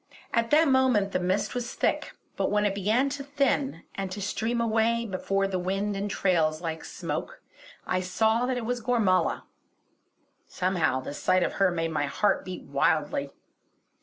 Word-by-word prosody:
At 230 0 +1
that 310 +2 +5
moment 260 -7 +3
the - - 0
mist 185 +3 0
was 245 0 -4
thick; - - 0 0.2
but - - 0
when 210 0 +2
it 200 - +1
began 215 +7 +1
to 280 0 -5
thin, 275 - 0
and 195 -1 -4
to 200 - -5
stream 220 +4 -1
away 230 +1 +1
before 195 -1 -1
the 190 -1 -2
wind 195 +3 -1
in 200 +1 -2
trails 165 -6 +1
like 160 -1 -4
smoke, - - -5 0.5
I 185 - 0
saw 220 +6 +1
that 255 -1 0
it 235 - -3
was 245 +1 -2
Gormala. 220 -7 +2 1.0
Somehow 175 -8 0
the 135 - -6
sight 185 +4 +2
of - - -1
her 195 - +6
made 165 -2 -2
my 145 -2 0
heart 200 +7 +1
beat 185 -1 -7
wildly. 150 -3 0
200 Hz, 170 wpm, -27 LUFS, 185-235 Hz, 1.0 s, her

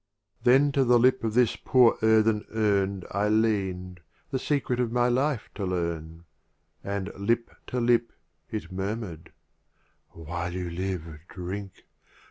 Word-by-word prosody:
Then 135 +4 +5
to 135 -1 +2
the 120 -1 +5
Lip 130 +1 +3
of 110 -1 -1
this 125 -2 +4
poor 125 -3 +4
earthen 110 -1 +3
Urn 100 -3 +1
I 100 +2 +1
lean'd, 95 -5 0 0.3
the 130 - 0
Secret 130 -3 -1
of 120 -2 0
my 120 0 +2
Life 130 0 0
to 100 - -5
learn: 85 -3 -3 0.6
And 100 0 -3
Lip 115 +4 0 0.2
to 125 - -2
Lip 120 0 +2 0.4
it 110 -3 -5
murmur'd 95 -3 -5 0.3
— - - -43
" - - -44
While 85 +2 -5
you 90 -1 -4
live, 90 -1 -3 0.3
"Drink! 95 +2 -7
105 Hz, 145 wpm, -27 LUFS, 90-120 Hz, 0.6 s, Then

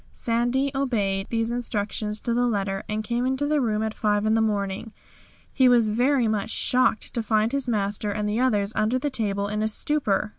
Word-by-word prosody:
"Sandy" 245 +4 0
obeyed 205 -8 -1
these 225 0 -1
instructions 215 -2 -2
to 235 - -1
the 245 +1 +2
letter, 195 -3 -1
and 215 +1 -2
came 240 +2 -1
into 265 +2 0
the 295 0 +1
room 220 -3 0
at 220 0 -2
5 210 -1 0
in 220 - +2
the 225 - +3
morning. 205 0 -2 0.6
He 260 -2 +4
was 235 -3 +4
very 245 +3 +2
much 215 -2 -1
shocked 250 -2 +1
to 235 - -1
find 220 0 +1
his 275 -2 -1
master 210 -2 -1
and 210 +1 -2
the 210 +2 -1
others 210 -5 +1
under 215 +4 +1
the 285 +3 -2
table 200 -4 -1
in 210 +1 -2
a 215 - +1
stupor. 220 -2 0
220 Hz, 200 wpm, -24 LUFS, 210-245 Hz, 0.6 s, He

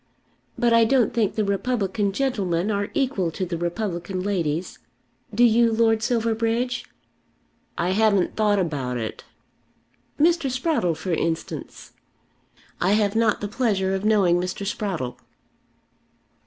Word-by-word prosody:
But 240 -2 +2
I 230 0 +6
don't 240 -1 +2
think 225 -4 0
the 215 - 0
republican 200 0 0
gentlemen 200 -6 -1
are 200 0 -1
equal 255 - 0
to 185 +3 -3
the 175 -1 -4
republican 175 +1 -3
ladies. 175 -4 -2 0.5
Do 225 +3 +2
you, 235 0 +5
Lord 225 -1 +2
Silverbridge?" 230 +1 0 0.9
"I 175 +2 0
haven't 200 -2 +2
thought 210 -1 +2
about 140 -9 -2
it." 110 -2 -5 0.9
"Mr. 330 -2 +3
Sprottle 255 - 0
for 185 - -3
instance." 165 0 -4 0.9
"I 185 +3 +3
have 210 -1 +1
not 225 -2 +2
the 205 - -2
pleasure 200 -4 0
of 195 0 -2
knowing 195 -5 +3
Mr. 185 +2 -4
Sprottle." 175 - -3
205 Hz, 130 wpm, -23 LUFS, 180-230 Hz, 0.9 s, I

